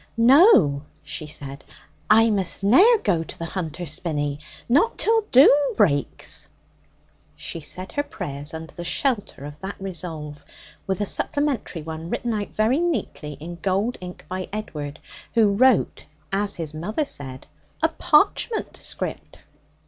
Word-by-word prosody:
'No,' 235 - +6 0.2
she 150 +1 -5
said, 140 -2 -6 0.5
'I 225 +1 +6
must 195 -2 0
ne'er 375 - +7
go 170 -5 +1
to - - -9
the 165 - -4
Hunter's 165 -2 -4
Spinney 145 -3 -1 0.3
not 285 - +3
till 450 0 +3
doom 280 +2 +6
breaks!' 145 -10 0 0.9
She 80 - -5
said 185 +4 -5
her 290 - 0
prayers 145 - -6
under 160 0 -8
the 175 - -7
shelter 205 - -1
of 145 +1 -9
that 190 +1 -7
resolve, 160 -6 -6 0.4
with 190 +1 -1
a - - +1
supplementary 280 - -1
one 160 +1 -6
written 235 +4 -2
out 205 -1 -3
very 225 +7 +1
neatly 320 - -2
in 165 +5 -9
gold 200 +5 0
ink 180 0 -9
by 185 0 -5
Edward, 150 -9 -5 0.4
who 215 -3 +4
wrote, 255 +2 +3 0.3
as 200 +1 +1
his 160 -3 -4
mother 210 - -2
said, 130 - -6 0.4
'a 320 - +5
parchment 385 +8 +1
script.' - - -5
185 Hz, 140 wpm, -23 LUFS, 155-235 Hz, 0.9 s, ne'er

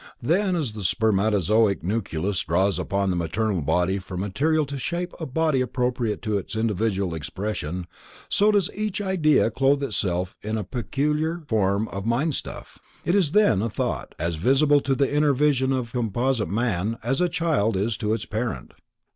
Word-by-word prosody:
Then, 180 - +1
as 145 -10 -2
the 105 -2 -6
spermatozoic 105 0 +2
nucleus 95 -2 -1
draws 95 +2 +1
upon 100 -1 0
the - - -1
maternal 90 +3 -1
body 90 +6 +1
for 95 -1 -8
material 140 - +1
to 140 0 -6
shape 175 +5 -3
a 160 - -4
body 155 -1 +1
appropriate 125 -3 -1
to 105 -2 0
its 100 - -8
individual 105 -4 0
expression, 90 +1 -4 0.4
so 210 +1 +3
does 200 -4 +2
each 210 -1 -2
idea 165 - +2
clothe 135 +4 +2
itself 95 -7 -2
in 110 +1 -2
a 105 - -2
peculiar 150 - -1
form 105 -1 +1
of 100 +2 -5
mindstuff. 135 +6 -2 0.3
It 170 - +2
is 185 -7 +2
then 135 - +4
a 115 - -1
thought, - - -3
as 85 +1 -2
visible 140 - +4
to 135 -1 0
the 140 +1 +1
inner 145 -1 +3
vision 135 -2 +2
of 125 -3 -2
composite 120 -2 0
man, 110 0 -1
as 135 +7 0
a 180 - +3
child 160 - +1
is 105 +3 0
to 110 -2 -1
its 115 - -3
parent. 110 - -4
115 Hz, 170 wpm, -24 LUFS, 100-145 Hz, 0.4 s, then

